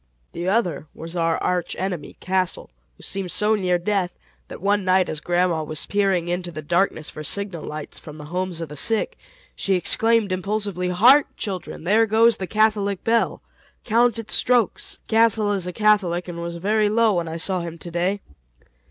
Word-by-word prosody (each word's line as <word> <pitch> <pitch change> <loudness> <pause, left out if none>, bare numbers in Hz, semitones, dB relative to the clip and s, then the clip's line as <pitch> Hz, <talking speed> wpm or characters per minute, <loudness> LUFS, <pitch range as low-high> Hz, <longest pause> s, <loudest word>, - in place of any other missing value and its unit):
The 175 +2 -3
other 180 -9 0
was 165 +2 -8
our 165 -1 +1
arch 180 -2 -1
enemy, 180 -6 -4
Castle, 185 - -1 0.3
who - - -16
seemed 195 -2 -4
so 210 +4 +2
near 185 -4 +1
death 180 0 -1 0.3
that - - -9
one 200 +2 +1
night 185 0 +3
as 155 - -3
grandma 175 0 +1
was 155 0 -2
peering 195 -4 +1
into 175 0 -2
the 155 -2 -7
darkness 170 0 0
for 155 - -8
signal 195 -1 -2
lights 150 0 -6
from 150 -1 -11
the 150 - -9
homes 180 +1 -3
of 165 - -5
the 150 - -8
sick, 225 - +1 0.4
she 195 - +1
exclaimed 225 +4 +1
impulsively, 190 -1 -2
"Hark, 245 +11 +6
children! 190 -5 -5
there 215 +6 +3
goes 225 +1 +4
the 190 - -4
Catholic 210 -2 +1
bell. 230 0 +1 0.4
Count 235 +1 +3
its 225 -2 -5
strokes. 245 -4 +1
Castle 220 -2 +3
is 190 -3 -1
a - - -2
Catholic, 185 -3 +2
and 170 -1 -6
was 170 0 -4
very 210 +4 +1
low 225 0 +3
when 170 -2 -1
I 160 +1 -4
saw 185 +2 0
him 170 -1 -6
to 170 +1 -9
day." 180 +4 0
185 Hz, 185 wpm, -23 LUFS, 170-210 Hz, 0.4 s, Hark